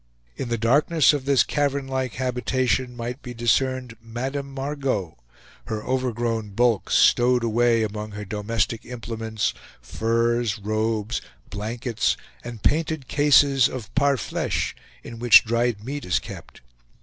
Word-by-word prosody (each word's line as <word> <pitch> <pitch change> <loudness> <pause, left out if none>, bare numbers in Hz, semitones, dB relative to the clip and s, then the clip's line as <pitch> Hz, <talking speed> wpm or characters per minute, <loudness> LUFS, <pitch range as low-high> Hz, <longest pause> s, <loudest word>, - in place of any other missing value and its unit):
In 125 - -5
the 115 - 0
darkness 145 +7 +4
of 140 -3 -3
this 140 -3 +4
cavern 140 -2 -1
like 130 -2 -2
habitation, 125 0 -1
might 120 +3 -5
be 125 -1 -8
discerned 125 +1 0
Madame 135 +5 -4
Margot, 135 - -3 0.5
her 110 -1 -4
overgrown 120 -5 -2
bulk 120 -3 +2
stowed 125 0 +4
away 115 0 +2
among 105 0 -5
her 105 0 -6
domestic 105 +2 -2
implements, 115 -2 -3 0.3
furs, 115 - 0
robes, 110 +1 -1 0.3
blankets, 110 +3 -1 0.3
and 120 -3 -8
painted 155 -3 0
cases 140 -2 +4
of 125 -5 -8
PAR' 140 0 +3
FLECHE, 110 - -2 0.3
in 115 - -9
which 120 -2 +7
dried 115 -2 0
meat 145 +2 -4
is 90 - +1
kept. - - -9
120 Hz, 130 wpm, -24 LUFS, 110-130 Hz, 0.5 s, which